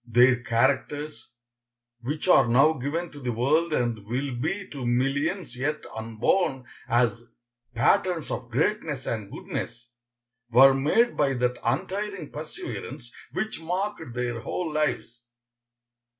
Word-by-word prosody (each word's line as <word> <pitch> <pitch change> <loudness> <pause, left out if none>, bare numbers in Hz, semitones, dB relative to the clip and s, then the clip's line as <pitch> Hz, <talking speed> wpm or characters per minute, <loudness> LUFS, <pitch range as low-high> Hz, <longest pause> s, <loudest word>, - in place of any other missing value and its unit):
Their 120 +1 +5
characters, 135 +3 0 0.7
which 150 +8 -3
are 135 -8 +6
now 135 +7 +5
given 160 +5 -3
to 145 - -11
the 125 -3 -2
world 155 +8 +2
and 120 -7 0
will 130 +3 -2
be 175 +11 -2
to 140 -3 -6
millions 135 +5 0
yet 145 +4 -2
unborn 125 - 0 0.2
as 120 0 +1 0.5
patterns 165 +7 +2
of 120 0 -4
greatness 150 - -1
and 110 -4 -4
goodness, 115 0 -6 0.6
were 135 +3 +8
made 155 - +2
by 140 -2 +2
that 125 -1 0
untiring 190 - -2
perseverance 125 -4 -7 0.2
which 195 0 -3
marked 180 - -3
their 120 -1 -2
whole 160 +7 -3
lives. 150 -6 -1
135 Hz, 120 wpm, -26 LUFS, 120-160 Hz, 0.7 s, were